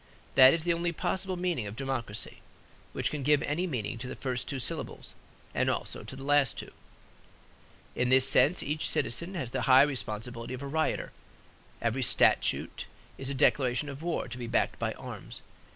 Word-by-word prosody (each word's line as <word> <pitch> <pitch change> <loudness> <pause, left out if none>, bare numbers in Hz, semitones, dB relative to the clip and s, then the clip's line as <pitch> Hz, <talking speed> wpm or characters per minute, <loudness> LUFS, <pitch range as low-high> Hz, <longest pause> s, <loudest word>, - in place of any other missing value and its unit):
That 130 0 +9
is 165 - -3
the 170 0 +2
only 170 +1 -1
possible 185 +2 -2
meaning 175 - -1
of 100 - -7
democracy, 120 -5 -3 0.5
which - - -2
can 150 - -3
give 145 +1 +3
any 170 +6 -1
meaning 115 - -3
to 125 - -5
the 130 - -6
first 125 -2 -3
two 140 - -2
syllables 125 - -4 0.4
and - - +1
also - - -3
to - - -8
the 135 - -9
last 145 -2 +3
two. - - -7 1.2
In 125 0 +1
this 130 0 +6
sense 170 +6 +4
each 150 +1 -1
citizen 170 +10 -1
has 130 -9 -4
the - - -1
high 130 +1 +9
responsibility 120 -3 -3
of 130 - -8
a - - -4
rioter. 155 +3 -1 0.7
Every 120 +3 0
statute 120 - +2 0.3
is 135 - -4
a 140 - -3
declaration 130 +1 +2
of 140 +1 -8
war, 170 -4 -2
to 120 +1 -7
be 120 - -4
backed - - 0
by - - -1
arms. - - -9
135 Hz, 185 wpm, -29 LUFS, 125-155 Hz, 1.2 s, That